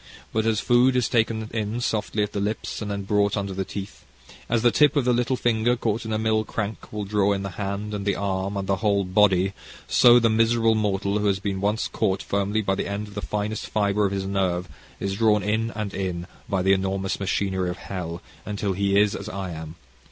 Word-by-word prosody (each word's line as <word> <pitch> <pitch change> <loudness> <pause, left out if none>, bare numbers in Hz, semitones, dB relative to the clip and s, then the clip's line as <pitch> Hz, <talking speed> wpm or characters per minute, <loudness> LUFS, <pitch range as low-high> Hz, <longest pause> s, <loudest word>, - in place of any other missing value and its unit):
But 110 0 +1
as 110 -2 +2
food 125 +2 +4
is 125 -2 +2
taken 110 -1 +1
in 110 +1 -2
softly 110 -2 -1
at 105 - -3
the 100 - -3
lips, 105 +3 -3
and 105 - -4
then 100 -1 -3
brought 100 +1 +1
under 100 -1 -2
the 95 +1 -2
teeth, 95 -9 -7 0.5
as 115 -1 +1
the 120 - +5
tip 150 +2 +4
of 140 -4 +2
the 125 - +3
little 125 +2 +1
finger 120 0 +2
caught 115 -1 -2
in 110 - -4
a 110 - +1
mill 110 0 +1
crank 110 -1 -5
will 105 -1 -3
draw 100 0 +2
in 100 0 -3
the 100 - -4
hand, 100 +3 -4
and 100 -1 -3
the 100 0 +1
arm, 100 0 -2
and 100 - -2
the 95 - +1
whole 100 -1 +2
body, 95 0 +3 0.3
so 120 -1 +7
the 115 -1 +4
miserable 115 0 +3
mortal 100 -1 0
who 105 - +1
has 100 -1 +2
been 95 0 -3
once 105 +2 0
caught 95 - -1
firmly 100 +2 0
by 95 - +1
the - - -2
end 100 +1 -4
of - - -13
the 105 - -4
finest 105 +1 -3
fibre 105 -1 +1
of - - -4
his 95 -1 -2
nerve, 95 -2 0 0.3
is 100 0 -2
drawn 105 -2 +3
in 110 +2 0
and 105 -2 -4
in, 90 -3 -3 0.2
by 95 -3 0
the 95 +1 +5
enormous 95 0 -1
machinery 95 -2 -1
of 90 - -4
hell, 90 -3 -6 0.2
until 100 -1 -2
he 100 +1 +2
is 105 -1 +3
as 100 - -6
I 95 -3 -4
am. 80 0 -7
100 Hz, 230 wpm, -24 LUFS, 95-110 Hz, 0.5 s, so